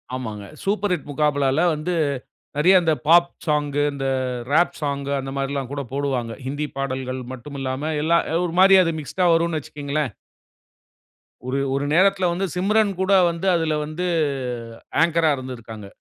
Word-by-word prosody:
ஆமாங்க. 110 -5 -6 0.2
Super 205 0 0
hit 155 - -4
முகாபலா 145 -1 +1
வ்ல 160 - +2
வந்து 165 +4 -2 0.6
நெறைய 175 +6 +5
இந்த, 160 -2 +2
பாப் 170 +1 +6 0.2
சாங் 150 -2 +1 0.2
இந்த 135 -1 -3 0.4
ராப் 160 0 +3
சாங் 140 -2 -2
அந்த 135 0 -5
மாரில்லாம் 135 -1 -2
கூட 140 0 -3
போடுவாங்க. 135 -5 -1
ஹிந்தி 145 +3 -2
பாடல்கள் 130 -1 -3
மட்டுமில்லாம 135 +3 -4
எல்லாம் 170 +2 +2 0.2
ஒரு 170 - -4
மாரி 195 +1 +8
அது 165 - 0
மிக்ஸ்ட்‌டா 180 +5 -1
வரும்னு 165 -1 +1
வச்சுக்ங்ளேன். 145 -3 -3 1.3
ஒரு 135 +2 -1 0.2
ஒரு 140 +1 -1
நேரத்துல 190 0 +4
வந்து 190 +3 -1
சிம்ரன் 205 +2 +2
கூட 190 +1 +2 0.2
வந்து 170 +3 -4
அதுல 160 -2 0
வந்து 165 +4 -3 1.0
ஆங்கரா 165 -2 +3
இருந்திருக்காங்க. 115 -5 -8
150 Hz, 140 wpm, -22 LUFS, 135-170 Hz, 1.3 s, மாரி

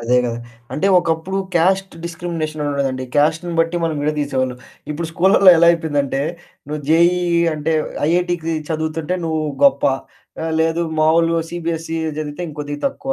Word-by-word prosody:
అదే 120 +2 +1
గదా! 120 -1 -2 0.3
అంటే 185 - 0
ఒకప్పుడు 165 +2 -2 0.2
క్యాస్ట్ 190 +3 +2
డిస్‌క్రిమినేషన్ 165 -2 -4
అనుండేదండి. 135 -2 -1
క్యాస్ట్‌ని 160 +4 +1
బట్టి 165 +1 0
మనం 160 - -1
విడదీసేవాళ్ళు. 140 -4 -1 0.3
ఇప్పుడు 160 +2 -3
స్కూళ్ళల్లో 190 +3 +6
ఎలా 170 - +5
అయిపోయిందంటే 145 -5 0 0.5
నువ్వు 150 0 -4
జెఈఈ 170 +3 +4 0.3
అంటే 155 +1 -1 0.4
ఐఐటీకి 175 -1 0
చదువుతుంటే 160 +2 -2
నువ్వు 160 -1 -1 0.2
గొప్ప. 140 - +4 0.6
ఆ! - - -2 0.2
లేదు 165 +1 +1 0.2
మామూలు 165 +1 +3 0.2
సిబిఎస్ఈ 165 -1 -3 0.2
చదివితే 155 +3 -5
ఇంకొద్దిగా 145 -1 -6
తక్కువ. 270 -1 -3
160 Hz, 135 wpm, -19 LUFS, 150-170 Hz, 0.6 s, స్కూళ్ళల్లో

